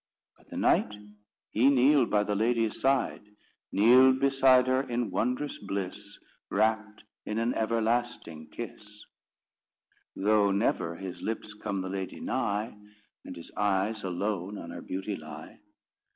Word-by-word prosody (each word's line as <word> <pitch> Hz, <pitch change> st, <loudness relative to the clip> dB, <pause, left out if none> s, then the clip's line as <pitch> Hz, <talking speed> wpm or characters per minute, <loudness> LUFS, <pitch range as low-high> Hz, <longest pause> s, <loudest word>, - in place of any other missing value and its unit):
But -, -, -26 dB
the -, -, -7 dB
knight 105 Hz, -, +2 dB, 0.6 s
he 125 Hz, +5 st, +4 dB
kneeled 135 Hz, -1 st, +4 dB
by 105 Hz, -1 st, +2 dB
the 105 Hz, -, -2 dB
lady's 115 Hz, +1 st, 0 dB
side; 135 Hz, -2 st, +1 dB, 0.5 s
Kneeled 130 Hz, +5 st, +6 dB
beside 135 Hz, -2 st, +4 dB
her 130 Hz, +1 st, +2 dB
in 120 Hz, -3 st, -3 dB
wondrous 125 Hz, +5 st, -2 dB
bliss, 100 Hz, 0 st, -5 dB, 0.3 s
Rapt 110 Hz, -1 st, 0 dB, 0.2 s
in 105 Hz, -, -4 dB
an 115 Hz, +2 st, 0 dB
everlasting 115 Hz, -8 st, -1 dB
kiss: 105 Hz, -2 st, -9 dB, 1.1 s
Though 105 Hz, 0 st, +3 dB
never 95 Hz, -4 st, 0 dB
his 95 Hz, 0 st, -7 dB
lips 110 Hz, -1 st, -4 dB
come 100 Hz, -2 st, -4 dB
the 95 Hz, -, -5 dB
lady 95 Hz, -1 st, -5 dB
nigh, 105 Hz, +2 st, -2 dB, 0.5 s
And 90 Hz, -, -8 dB
his 85 Hz, -, -11 dB
eyes 105 Hz, +2 st, 0 dB
alone 95 Hz, +1 st, -3 dB
on 85 Hz, -2 st, -8 dB
her 85 Hz, 0 st, -7 dB
beauty 95 Hz, +2 st, -4 dB
lie. 75 Hz, -1 st, -10 dB
105 Hz, 135 wpm, -29 LUFS, 100-120 Hz, 1.1 s, Kneeled